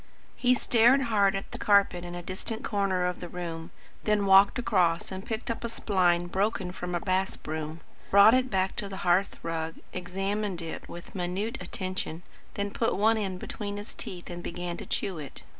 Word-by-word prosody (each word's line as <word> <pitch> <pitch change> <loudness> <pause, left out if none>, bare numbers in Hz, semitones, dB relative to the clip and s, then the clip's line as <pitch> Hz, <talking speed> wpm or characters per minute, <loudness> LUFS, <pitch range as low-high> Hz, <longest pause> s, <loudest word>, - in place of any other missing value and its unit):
He 250 0 +3
stared 245 +1 +5
hard 205 -5 +3
at 195 - -5
the - - -7
carpet 200 -4 +4
in 175 0 -6
a 175 - -6
distant 190 +5 -4
corner 195 -3 +1
of 180 0 -2
the 175 - -7
room, 165 -2 -5 0.3
then 210 -1 +2
walked 195 +3 +6
across 185 -10 +1
and 190 0 -5
picked 225 +2 -3
up 230 - -5
a - - -1
spline 180 -6 +2
broken 190 0 -1
from 180 -1 -4
a - - +1
bass 190 -1 0
broom; 155 +1 -5 0.3
brought 200 +3 +8
it 255 0 +3
back 190 -2 0
to 200 - -3
the 190 - -6
hearth 180 +3 +3
rug; 165 -1 -3 0.2
examined 195 +1 -2
it 165 -1 -7
with 175 - -10
minute 190 +6 -2
attention; 185 -3 -3 0.3
then 200 0 -2
put 230 - 0
one 220 +3 +4
end 190 -3 -2
between 205 +2 -5
his 205 +1 -7
teeth 175 -1 -5
and 175 0 -6
began 175 0 -4
to - - -8
chew 185 -5 -2
it. 145 -3 -9
190 Hz, 190 wpm, -28 LUFS, 175-205 Hz, 0.3 s, brought